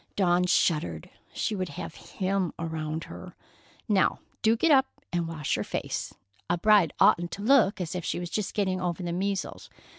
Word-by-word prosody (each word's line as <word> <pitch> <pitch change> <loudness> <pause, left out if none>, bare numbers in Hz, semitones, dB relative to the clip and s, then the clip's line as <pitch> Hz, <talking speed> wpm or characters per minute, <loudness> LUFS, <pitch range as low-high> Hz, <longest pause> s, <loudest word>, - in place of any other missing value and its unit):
Dawn 180 -2 +3
shuddered. 150 - +1 0.2
She 215 - -2
would 185 -2 -3
have 145 - -7
him 190 -2 -2
around 160 -1 -3
her. - - -10 0.5
"Now, 200 -4 +3 0.2
do 225 +1 +3
get 330 +7 +3
up 270 -2 +6 0.3
and 170 -1 0
wash 155 -3 -2
your - - -2
face. - - -3 0.4
A 175 - +2
bride 200 -3 +5
oughtn't 175 0 +4
to 200 - -6
look 220 -5 +4
as 175 -3 -3
if 180 -1 -4
she - - -2
was 175 -1 -5
just 210 -3 -2
getting 190 -3 0
over 180 0 -2
the 170 -1 -2
measles. 195 +1 -3
180 Hz, 180 wpm, -27 LUFS, 165-200 Hz, 0.5 s, up